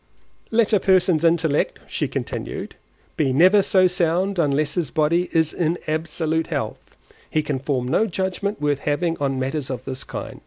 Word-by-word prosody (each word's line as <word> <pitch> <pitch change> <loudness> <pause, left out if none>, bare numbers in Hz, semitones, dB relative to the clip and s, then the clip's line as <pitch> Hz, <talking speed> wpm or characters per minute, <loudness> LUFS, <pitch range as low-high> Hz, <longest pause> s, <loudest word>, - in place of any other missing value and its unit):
Let 225 -1 +2
a 210 - +5
person's 180 -4 +3
intellect 165 -3 +2
(she - - -2
continued) - - -5 0.4
be 140 -4 +2
never 185 +9 +5
so 190 -1 +3
sound, 180 +2 +1
unless 150 -1 +1
his 170 -6 -1
body 165 +4 +1
is 160 -1 +2
in 170 0 0
absolute 160 +1 -1
health, - - -5 0.3
he 155 - 0
can 145 -3 -2
form 130 -2 -2
no 190 - +2
judgement 190 +2 -2
worth 145 -2 0
having 165 +4 0
on 135 -2 -1
matters 135 +2 -2
of 130 -1 -5
this 130 -1 -5
kind. - - -7
160 Hz, 165 wpm, -22 LUFS, 145-180 Hz, 0.4 s, a